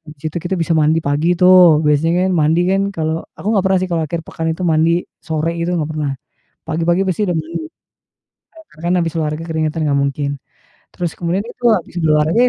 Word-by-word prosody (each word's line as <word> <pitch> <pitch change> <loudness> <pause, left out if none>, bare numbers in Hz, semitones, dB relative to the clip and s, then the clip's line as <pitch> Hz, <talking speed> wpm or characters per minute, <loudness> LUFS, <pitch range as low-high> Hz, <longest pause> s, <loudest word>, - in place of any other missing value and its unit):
Di - - -32
situ 155 - -20
kita 175 +3 -3
bisa 165 0 -1
mandi 155 +1 +3
pagi 150 +4 +1
tuh, 180 -4 +7
biasanya 165 +5 +2
kan, - - 0
mandi 160 +3 +3
kan, 195 +1 +2
kalau 160 -1 -2
aku - - -7
gak 190 - +2
pernah 190 -1 +3
sih 185 - -2
kalau 165 -2 0
akhir 165 +2 -4
pekan 160 - -4
itu 175 - -9
mandi 165 +2 +2 0.2
sore 160 +1 -2
gitu, 170 +1 -1
gak 155 -3 -1
pernah. 150 -3 -2 0.6
Pagi-pagi 170 +3 +1
pasti 190 +2 -1
udah 175 - 0
mandi. 160 0 -4 1.1
Karena 155 - -17
kan 175 - +2
habis 165 -1 -3
olahraga 155 +1 -2
keringetan, 160 -1 -1
gak 140 -1 +2
mungkin. 140 0 -2 0.5
Terus 175 -3 -3
kemudian 175 +3 -1
itu 240 +1 -12
habis 175 -2 -3
olahraga 155 +4 +2
165 Hz, 195 wpm, -17 LUFS, 155-175 Hz, 1.1 s, tuh